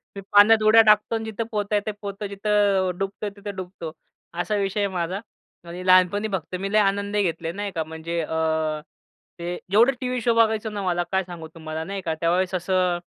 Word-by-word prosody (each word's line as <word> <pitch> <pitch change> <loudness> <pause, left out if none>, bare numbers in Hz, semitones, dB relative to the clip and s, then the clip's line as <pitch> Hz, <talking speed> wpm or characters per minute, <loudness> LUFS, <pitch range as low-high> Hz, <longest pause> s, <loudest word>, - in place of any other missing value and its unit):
मी 200 - -6
पाण्यात 215 +2 +7
उड्या 220 +1 +7
टाकतो 215 +1 +4
आणि 225 0 -3
जिथं 220 +1 -3
पोहता 210 -1 -1
येते 205 - 0
तेथे 205 - -17
पोहतो, 200 0 -5
जिथं 200 -2 +1
डुबता 195 +2 -4
येते 200 0 -10
तिथं 205 -1 -6
डुबतो, 180 -3 -7 0.5
असा 210 - -1
विषय 200 0 -1
आहे 200 - +2
माझा. 180 +2 -2 0.5
आणि, 175 +2 -7
लहानपणी 185 +3 +4
फक्त 185 0 -3
मी 195 +1 -3
लय 215 - +5
आनंदही 200 0 +1
घेतले 165 -2 -2
नाही 200 +2 -4
का 165 - 0
अ, - - 0
म्हणजे 160 +2 -5
अ, 160 -1 -1 0.6
ते 175 +1 -3 0.2
जेवढे 230 +6 +6
टी-व्ही 250 -1 -2
शो 235 +1 +2
बघायचो 220 -1 +2
ना 210 -1 -5
मला 175 -1 0
काय 190 0 +1
सांगू 175 -3 -9
तुम्हाला 160 0 -5
नाही 195 +3 -5
का? 165 -3 -2
त्यावेळेस 180 +3 +1
असं 180 -1 +1
195 Hz, 205 wpm, -24 LUFS, 175-210 Hz, 0.6 s, पाण्यात